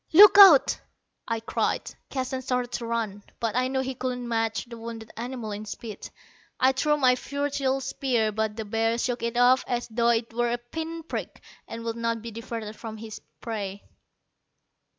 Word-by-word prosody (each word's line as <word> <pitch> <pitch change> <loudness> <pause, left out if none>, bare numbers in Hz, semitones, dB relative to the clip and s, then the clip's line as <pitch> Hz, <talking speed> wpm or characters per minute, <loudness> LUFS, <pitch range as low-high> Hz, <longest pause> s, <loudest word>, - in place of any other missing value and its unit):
"Look 405 +3 +9
out!" 365 -9 +8 0.5
I 230 -1 -1
cried. 225 - -1 0.2
Keston 260 -1 -3
started 250 -1 -1
to 235 -1 -4
run, 220 -3 -2 0.2
but 225 -2 -1
I 255 +1 +2
knew 265 0 0
he 265 0 -3
could 255 0 -3
not 245 -1 -6
match 225 -1 -1
the 235 -1 -10
wounded 225 -1 -8
animal 240 -2 -5
in 205 +1 -5
speed. 215 0 -7 0.5
I 260 - +5
threw 295 +3 +1
my 255 -3 +4
futile 280 0 -1
spear, 250 -4 0
but 220 0 -1
the 220 -1 -5
bear 225 +2 0
shook 240 0 -1
it 235 +1 -2
off 250 +1 +5
as 245 -1 -2
though 235 +1 +2
it 230 0 +1
were 240 +1 +1
a 240 - 0
pin 320 +7 -6
prick, - - -6 0.2
and 230 0 -7
would 230 0 -3
not 230 -1 -1
be 230 - -6
diverted 225 -1 -6
from 220 -1 -8
his 220 0 -8 0.2
prey. 205 -3 -5
235 Hz, 185 wpm, -26 LUFS, 225-260 Hz, 0.5 s, Look